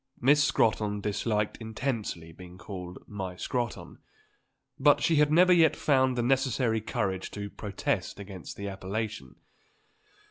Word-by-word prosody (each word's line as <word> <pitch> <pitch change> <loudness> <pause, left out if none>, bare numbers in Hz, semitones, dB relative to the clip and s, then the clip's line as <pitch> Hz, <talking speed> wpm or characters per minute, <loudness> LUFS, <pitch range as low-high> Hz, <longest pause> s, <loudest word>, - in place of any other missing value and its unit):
Miss 145 +4 +5
Scrotton 105 -5 +1
disliked 105 +1 -1
intensely 110 -7 -4
being 90 +2 -12
called 90 -2 -8
"my 95 -3 -5
Scrotton;" 120 +4 -4 0.8
but 145 +1 +5
she 165 - +3
had 150 0 +4
never 180 +3 +6
yet 165 -3 +5
found 130 -3 +2
the 120 - +1
necessary 125 -3 +1
courage 95 -3 -2
to 100 -1 -6
protest 100 0 -3
against 95 -3 -8
the 100 - -5
appellation. 95 - -5
110 Hz, 130 wpm, -28 LUFS, 95-130 Hz, 0.8 s, never